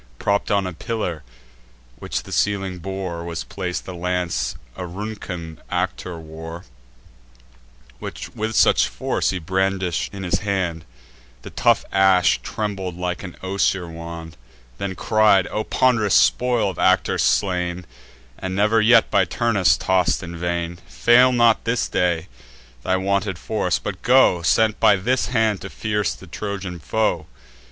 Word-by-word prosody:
Propp'd 100 +8 0
on 100 -2 +2
a 90 - -4
pillar, 90 -4 -3 0.8
which - - -3
the - - -12
ceiling 95 -3 0
bore, 95 -2 -5
Was 85 -1 -4
plac'd 90 -2 -5
the 95 - -7
lance 90 0 -2 0.2
Auruncan 90 -3 -6
Actor 90 -2 -2
wore; 80 +1 -9 1.3
Which - - -7
with 110 +1 -3
such - - +4
force - - -1
he 95 - -1
brandish'd 95 0 -1
in 100 -1 -7
his 95 +2 0
hand, 95 -6 -2 0.6
The - - -9
tough - - +2
ash 95 -2 +4
trembled 95 -4 -4
like 90 0 -3
an 90 -2 -9
osier 95 -1 0
wand: 85 0 -8 0.4
Then 95 -1 -3
cried: 105 -3 +3
"O 110 - -1
pond'rous 110 -7 +2
spoil 120 -5 +3
of 90 - -11
Actor - - +2
slain, 90 -2 0 0.5
And 95 0 -4
never 105 +3 +3
yet 115 +1 +5
by 95 -2 +4
Turnus 100 +1 +2
toss'd 95 0 +1
in 85 0 -7
vain, 85 0 -3
Fail 125 +2 +5
not 120 -2 +3
this 115 +1 0
day 85 -1 0 0.5
thy 95 +8 +1
wonted 100 0 -1
force; 90 0 -1
but 95 -2 -6
go, 125 -9 +4
Sent 110 +5 +2
by 105 - +6
this 120 +7 0
hand, 110 -5 +1
to - - -7
pierce 105 -3 -1
the - - -13
Trojan 95 -1 -5
foe! 85 -3 -1
95 Hz, 145 wpm, -22 LUFS, 85-105 Hz, 1.3 s, by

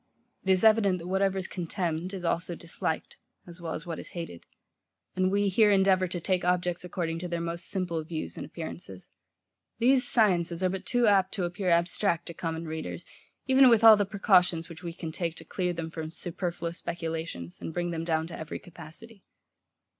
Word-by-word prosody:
It 190 - -3
is 185 +1 +4
evident, 215 -4 +5
that 170 - -8
whatever 195 +1 +1
is 190 - -2
contemned, 175 -1 -3
is 190 -3 -6
also 170 +1 -1
disliked, 165 -1 -4 0.3
as 175 0 -11
well 165 -1 -3
as 160 - -6
what 165 -2 -5
is - - -6
hated; 165 - -7 0.7
and 185 0 +2
we 200 +1 +2
here 210 +3 +4
endeavour 190 -2 +4
to 175 0 -3
take 185 +1 0
objects, 180 -1 0
according 170 -2 -3
to 180 - -4
their 170 -1 -2
most 170 0 -3
simple 175 -4 -2
views 155 - -5
and - - -6
appearances. 90 +3 -8 0.7
These 255 +2 +4
sciences 180 -6 +2
are 185 - +3
but 190 0 -5
too 245 -1 +3
apt 195 -3 +3
to 190 - -1
appear 180 +2 -1
abstract 170 +1 +2
to 170 - -7
common 165 0 -4
readers, 160 0 -5 0.4
even 265 0 +7
with 230 -2 +5
all 225 -1 +11
the 205 -2 0
precautions 180 -5 +3
which 165 0 -10
we 170 -2 -5
can 165 -2 -6
take 170 0 -2
to - - -12
clear 180 -2 -1
them 165 -1 -5
from 160 -1 -5
superfluous 170 +1 -4
speculations, 160 - -5
and - - -4
bring 175 +1 -2
them 165 -1 -3
down 160 -1 0
to 165 - -8
every 160 0 -5
capacity. 180 +5 -11
175 Hz, 195 wpm, -28 LUFS, 165-190 Hz, 0.7 s, all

